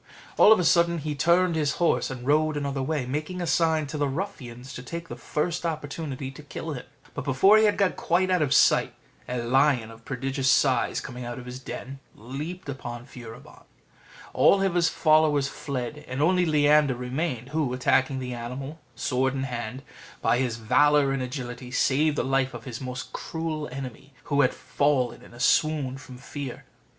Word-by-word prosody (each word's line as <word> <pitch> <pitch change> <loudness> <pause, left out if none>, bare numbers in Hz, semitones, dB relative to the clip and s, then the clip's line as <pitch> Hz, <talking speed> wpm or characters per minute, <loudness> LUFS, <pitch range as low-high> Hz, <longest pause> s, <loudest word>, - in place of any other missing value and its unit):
All 210 - +7
of 220 - +7
a - - +1
sudden 170 0 +3
he 150 -1 -3
turned 170 +4 +3
his 150 -2 +1
horse, 170 - +1
and 125 -2 -7
rode 155 +2 +2
another 140 -1 -2
way, 140 -1 -1
making 150 +7 -4
a 175 - -2
sign 160 -2 +2
to 145 +1 -5
the 145 - +2
ruffians 135 -6 -6
to - - -7
take 165 +6 -7
the - - -5
first 165 +3 -2
opportunity 145 -4 -4
to 135 - -12
kill 150 +2 -6
him; 130 -1 -8 0.3
but - - -5
before 190 +11 +5
he 220 - +4
had 210 - +2
got 195 -2 +1
quite 185 +2 +1
out 180 -2 +3
of 145 -3 +1
sight, - - +4 0.3
a 125 - -2
lion 125 -2 +2
of 115 0 -15
prodigious 135 0 -1
size, 130 -1 +2
coming 125 -1 -7
out 120 +1 -5
of 125 - -8
his 125 +1 -7
den, 135 +1 -7 0.2
leaped 145 - -7
upon 120 -3 -6
Furibon: 115 -3 -12 0.7
all - - +5
his 175 -3 +2
followers 155 -3 +3
fled, 140 0 -5
and 130 +1 -4
only 180 +3 +3
Leander 150 -2 +4
remained; 125 0 -3
who, 150 -3 -1
attacking 130 +1 +2
the 125 -1 -4
animal 130 +6 -6 0.2
sword 130 +1 0
in 135 - -2
hand, 125 0 -5 0.4
by 120 - +2
his 125 -3 -1
valour 145 +5 +3
and 135 -1 -1
agility 125 -1 -6
saved 145 +4 +2
the - - +1
life 135 0 0
of - - -8
his 125 -3 -7
most 130 0 -6
cruel 160 -3 -4
enemy, 135 +1 -8
who 145 -1 +1
had 125 - +3
fallen 130 -1 0
in - - -15
a 120 - -14
swoon 145 0 +2
from 135 -2 -11
fear. 130 0 -7
140 Hz, 185 wpm, -26 LUFS, 125-155 Hz, 0.7 s, All